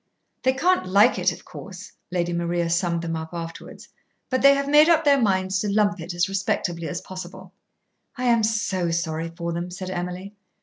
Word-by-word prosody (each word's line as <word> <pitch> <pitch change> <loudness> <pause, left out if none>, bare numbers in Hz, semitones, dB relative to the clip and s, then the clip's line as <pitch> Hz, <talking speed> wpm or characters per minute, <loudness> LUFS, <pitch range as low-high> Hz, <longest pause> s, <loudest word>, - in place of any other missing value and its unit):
"They 260 - +2
can't 350 - +1
like 205 +6 +4
it, - - +2
of - - -11
course," - - -10 0.2
Lady 175 -1 -1
Maria 170 0 -1
summed 170 -1 0
them 165 -1 -3
up 160 0 -5
afterwards, 165 -1 -8 0.4
"but 260 - +1
they 280 0 +7
have 280 0 -1
made 300 +3 +6
up 325 -1 +4
their 280 -2 +5
minds 190 -2 +1
to 205 0 -1
lump 205 -1 +2
it 170 +2 -6
as 175 +2 +1
respectably 180 -3 -2
as 175 - -4
possible." 185 0 -9 0.6
"I 250 - -4
am 235 -2 +3
so 205 -5 0
sorry 165 0 -2
for 170 0 -3
them," 170 +1 -4
said 185 +1 -6
Emily. 180 +2 -5
185 Hz, 190 wpm, -24 LUFS, 170-215 Hz, 0.6 s, they